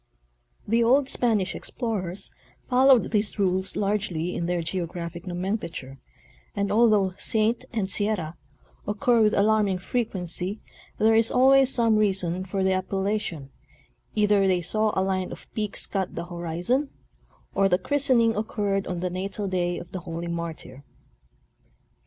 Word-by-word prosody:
The 230 Hz, +3 st, +3 dB
old 260 Hz, +4 st, +4 dB
Spanish 215 Hz, -6 st, +1 dB
explorers 200 Hz, -6 st, -4 dB, 0.4 s
followed 260 Hz, -1 st, +4 dB
these 210 Hz, -1 st, 0 dB
rules 190 Hz, -1 st, 0 dB
largely 195 Hz, -5 st, -1 dB
in 170 Hz, -, -2 dB
their 175 Hz, -1 st, -1 dB
geographic 170 Hz, 0 st, -5 dB
nomenclature, 175 Hz, -7 st, -4 dB, 0.6 s
and 200 Hz, -1 st, -1 dB
although 210 Hz, -4 st, +4 dB
"Saint" 220 Hz, +2 st, +1 dB
and 215 Hz, -5 st, -1 dB
"Sierra" 195 Hz, -5 st, 0 dB, 0.5 s
occur 225 Hz, +3 st, +2 dB
with 215 Hz, -1 st, +3 dB
alarming 205 Hz, -2 st, +2 dB
frequency, 190 Hz, -2 st, -3 dB, 0.4 s
there 220 Hz, +1 st, +4 dB
is 225 Hz, 0 st, +4 dB
always 270 Hz, +1 st, +5 dB
some 230 Hz, -4 st, +3 dB
reason 185 Hz, -4 st, 0 dB
for 190 Hz, +1 st, -2 dB
the 190 Hz, 0 st, +2 dB
appellation; 185 Hz, -6 st, -2 dB, 0.6 s
either 205 Hz, -2 st, +3 dB
they 180 Hz, -2 st, +1 dB
saw 215 Hz, +5 st, 0 dB
a -, -, +2 dB
line 185 Hz, -1 st, -1 dB
of -, -, -9 dB
peaks 210 Hz, -2 st, 0 dB
cut 190 Hz, -2 st, -3 dB
the 170 Hz, -, -4 dB
horizon 175 Hz, -, -2 dB, 0.6 s
or 195 Hz, 0 st, +3 dB
the 180 Hz, -, +3 dB
christening 235 Hz, 0 st, +2 dB
occurred 205 Hz, -2 st, -1 dB
on 175 Hz, -1 st, -3 dB
the 180 Hz, -, -1 dB
natal 195 Hz, +2 st, -4 dB
day 175 Hz, -2 st, -1 dB
of 170 Hz, -, -9 dB
the 185 Hz, -, -4 dB
holy 170 Hz, 0 st, -6 dB
martyr. 170 Hz, -5 st, -6 dB
195 Hz, 140 wpm, -25 LUFS, 180-220 Hz, 0.6 s, always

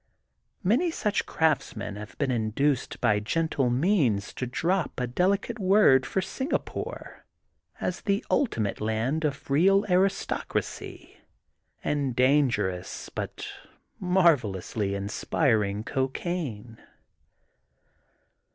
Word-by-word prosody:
Many 245 Hz, -, +3 dB
such 210 Hz, -10 st, -1 dB
craftsmen 155 Hz, -9 st, 0 dB
have 105 Hz, -1 st, -9 dB
been 140 Hz, -3 st, 0 dB
in 110 Hz, -3 st, 0 dB
duced 140 Hz, +3 st, 0 dB
by 105 Hz, -4 st, +3 dB
gentle 140 Hz, +3 st, 0 dB
means 125 Hz, -, +1 dB
to 125 Hz, -, -4 dB
drop 170 Hz, +8 st, -1 dB
a 125 Hz, -, 0 dB
delicate 195 Hz, -, 0 dB
word 185 Hz, -10 st, +5 dB
for 190 Hz, -, 0 dB
Singapore 265 Hz, -, -4 dB, 0.6 s
as 180 Hz, -, -2 dB
the 200 Hz, +2 st, 0 dB
ultimate 110 Hz, -, 0 dB
land 110 Hz, +9 st, 0 dB
of 140 Hz, -2 st, -3 dB
real 195 Hz, +8 st, +4 dB
aristocracy, 190 Hz, +2 st, -1 dB, 0.7 s
and 140 Hz, -4 st, -1 dB
dangerous 125 Hz, -9 st, +1 dB
but -, -, -5 dB, 0.5 s
marvel 170 Hz, -, +3 dB
ously 100 Hz, +1 st, -3 dB
inspiring 105 Hz, +1 st, 0 dB
cocaine. 130 Hz, -, -3 dB
140 Hz, 100 wpm, -27 LUFS, 110-180 Hz, 0.7 s, word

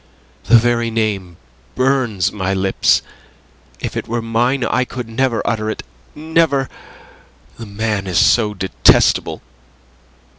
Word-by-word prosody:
"The 120 Hz, +3 st, +6 dB
very 120 Hz, 0 st, +1 dB
name 100 Hz, -6 st, -2 dB, 0.4 s
burns 130 Hz, -7 st, +1 dB
my 95 Hz, -1 st, -2 dB
lips. 95 Hz, 0 st, +2 dB, 0.8 s
If -, -, -5 dB
it -, -, -4 dB
were 120 Hz, +1 st, -2 dB
mine 120 Hz, +3 st, 0 dB
I 125 Hz, -, +1 dB
could 125 Hz, -1 st, -7 dB
never 120 Hz, +1 st, -1 dB
utter 110 Hz, -1 st, -1 dB
it -, -, -5 dB, 0.3 s
never! 155 Hz, -3 st, +1 dB, 0.9 s
The 115 Hz, -, -8 dB
man 105 Hz, -1 st, -2 dB
is 90 Hz, -, -1 dB
so 105 Hz, -3 st, +3 dB
detestable. 90 Hz, -11 st, +2 dB
115 Hz, 120 wpm, -18 LUFS, 100-125 Hz, 0.9 s, The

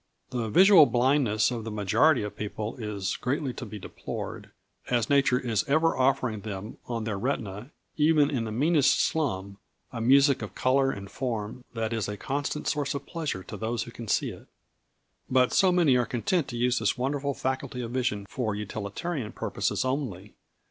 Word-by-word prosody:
] -, -, -49 dB
The 120 Hz, -3 st, -2 dB
visual 185 Hz, -, +7 dB
blindness 120 Hz, -3 st, +2 dB
of 115 Hz, -2 st, -4 dB
the 115 Hz, -, -5 dB
majority 110 Hz, +7 st, +3 dB
of 105 Hz, -, -5 dB
people 105 Hz, +1 st, -4 dB
is 105 Hz, -4 st, -3 dB
greatly 135 Hz, 0 st, -2 dB
to 120 Hz, -, -7 dB
be 105 Hz, -, -7 dB
deplored, 95 Hz, -, -7 dB, 0.4 s
as 120 Hz, 0 st, +1 dB
nature 140 Hz, -3 st, +4 dB
is 120 Hz, -2 st, 0 dB
ever 160 Hz, +3 st, +3 dB
offering 130 Hz, -5 st, +1 dB
them 105 Hz, 0 st, -7 dB
on 115 Hz, -2 st, -3 dB
their 105 Hz, -3 st, -3 dB
retina, 110 Hz, -2 st, -3 dB, 0.3 s
even 150 Hz, -1 st, +4 dB
in 120 Hz, -5 st, -1 dB
the 110 Hz, -, -4 dB
meanest 145 Hz, +4 st, +3 dB
slum, 100 Hz, -10 st, -1 dB, 0.3 s
a 115 Hz, -, -4 dB
music 135 Hz, +3 st, +5 dB
of 100 Hz, -3 st, -7 dB
colour 135 Hz, +1 st, +2 dB
and 100 Hz, -6 st, -5 dB
form 120 Hz, -2 st, -4 dB
that 115 Hz, 0 st, -2 dB
is 110 Hz, -3 st, -1 dB
a 105 Hz, 0 st, -4 dB
constant 145 Hz, +4 st, -3 dB
source 145 Hz, -2 st, -1 dB
of 140 Hz, -, -5 dB
pleasure 155 Hz, -, -4 dB
to -, -, -8 dB
those 110 Hz, 0 st, -2 dB
who 120 Hz, -, -10 dB
can 115 Hz, -1 st, -9 dB
see -, -, +1 dB
it. -, -, -13 dB, 0.8 s
But 130 Hz, -1 st, +3 dB
so 190 Hz, -2 st, +5 dB
many 170 Hz, -7 st, +4 dB
are 120 Hz, -, +1 dB
content 140 Hz, +5 st, 0 dB
to 120 Hz, -4 st, -5 dB
use 125 Hz, +1 st, +2 dB
this 110 Hz, +3 st, 0 dB
wonderful 140 Hz, +2 st, -1 dB
faculty 130 Hz, -1 st, -3 dB
of 115 Hz, -1 st, -5 dB
vision 120 Hz, -6 st, -1 dB
for 110 Hz, -3 st, -2 dB
utilitarian 105 Hz, -, -4 dB
purposes -, -, -1 dB
only. 125 Hz, -8 st, -3 dB
125 Hz, 185 wpm, -27 LUFS, 110-140 Hz, 0.8 s, visual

